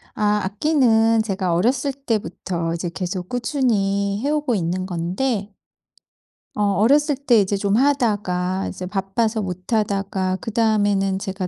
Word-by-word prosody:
아 210 0 +1
악기는 225 0 +3
제가 190 -4 -1
어렸을 255 - +1
때부터 190 -9 -3
이제 170 +1 -3
계속 180 0 -4
꾸준히 205 -6 0
해오고 295 -3 0
있는 185 -1 -1
건데 195 +5 -2 1.0
어 210 - 0
어렸을 285 - +3
때 250 -5 +3
이제 200 +1 0
좀 200 +1 0
하다가 205 -9 +1
이제 185 - -6
바빠서 200 +4 -1
못하다가 190 0 -1
그 225 - -5
다음에는 205 -4 +2
제가 190 -1 -4
205 Hz, 275 characters per minute, -21 LUFS, 190-230 Hz, 1.0 s, 악기는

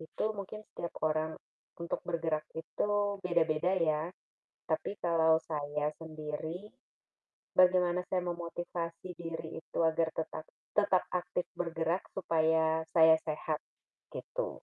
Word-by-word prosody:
itu 160 - -4
mungkin 210 +1 -6
setiap 170 0 -6
orang 155 0 +1 0.4
untuk 170 0 -3
bergerak 160 -2 0
itu 205 +3 0
beda-beda 170 0 +2
ya, 155 -3 +2 0.6
tapi 170 +5 -1
kalau 160 -2 +5
saya 150 -1 -1
sendiri 160 +5 -5 0.8
bagaimana 180 -1 +5
saya 185 - +3
memotivasi 175 0 -4
diri 165 -1 -5
itu - - -5
agar 160 0 +3
tetap 155 0 -3 0.3
tetap 205 -3 +4
aktif 180 0 -1
bergerak 165 +1 0
supaya 160 -2 +2
saya 160 -1 +8
sehat, 155 -1 -2 0.5
gitu. - - -3
165 Hz, 110 wpm, -33 LUFS, 160-180 Hz, 0.8 s, saya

